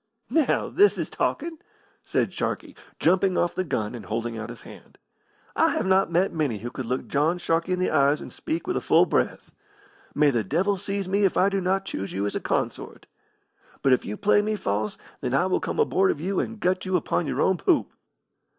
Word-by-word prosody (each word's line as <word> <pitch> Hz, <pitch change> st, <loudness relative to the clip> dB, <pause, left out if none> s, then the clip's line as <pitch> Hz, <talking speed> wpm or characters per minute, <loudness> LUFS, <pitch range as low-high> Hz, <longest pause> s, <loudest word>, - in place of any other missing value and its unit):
"Now, 315 Hz, -5 st, +2 dB
this 410 Hz, +1 st, +4 dB
is -, -, -3 dB
talking!" 325 Hz, -1 st, -2 dB, 0.4 s
said -, -, -1 dB
Sharkey, -, -, -3 dB, 0.2 s
jumping 185 Hz, +1 st, +2 dB
off 175 Hz, 0 st, +1 dB
the 185 Hz, -, -1 dB
gun 125 Hz, -10 st, -2 dB
and 120 Hz, -, -8 dB
holding 115 Hz, +1 st, -3 dB
out 110 Hz, -1 st, -6 dB
his -, -, -10 dB
hand. -, -, -14 dB, 0.6 s
"I -, -, +4 dB
have -, -, -1 dB
not 190 Hz, -2 st, +3 dB
met 180 Hz, +4 st, +2 dB
many 145 Hz, -9 st, -1 dB
who 120 Hz, +4 st, -6 dB
could 130 Hz, -2 st, -6 dB
look 125 Hz, +2 st, -2 dB
John 155 Hz, +5 st, +1 dB
Sharkey 170 Hz, 0 st, 0 dB
in -, -, 0 dB
the 185 Hz, -, 0 dB
eyes 140 Hz, 0 st, +3 dB
and -, -, -9 dB
speak 320 Hz, +1 st, -4 dB
with 365 Hz, -, -2 dB
a -, -, 0 dB
full -, -, +4 dB
breath. -, -, -1 dB, 0.6 s
May 150 Hz, -1 st, +4 dB
the 120 Hz, -4 st, 0 dB
devil 185 Hz, -, 0 dB
seize 200 Hz, 0 st, -3 dB
me 200 Hz, +2 st, +1 dB
if 195 Hz, -, +2 dB
I 190 Hz, -, +4 dB
do 195 Hz, -1 st, -1 dB
not 190 Hz, +1 st, 0 dB
choose 100 Hz, -, -5 dB
you 100 Hz, +2 st, -1 dB
as 100 Hz, -, -3 dB
a -, -, 0 dB
consort! -, -, -3 dB, 0.8 s
But 135 Hz, -, +5 dB
if 125 Hz, -, +2 dB
you 105 Hz, -, -5 dB
play 205 Hz, 0 st, +3 dB
me 215 Hz, +1 st, -1 dB
false, 105 Hz, -, -2 dB, 0.2 s
then 125 Hz, -1 st, -1 dB
I 175 Hz, -, +3 dB
will 185 Hz, -, +1 dB
come -, -, -4 dB
aboard 190 Hz, 0 st, +3 dB
of -, -, -1 dB
you 185 Hz, +4 st, -1 dB
and 225 Hz, -1 st, -3 dB
gut 185 Hz, -2 st, 0 dB
you 185 Hz, -1 st, -1 dB
upon 175 Hz, -2 st, 0 dB
your -, -, -1 dB
own 190 Hz, -1 st, +2 dB
poop." 340 Hz, -, +1 dB
180 Hz, 220 wpm, -25 LUFS, 130-195 Hz, 0.8 s, But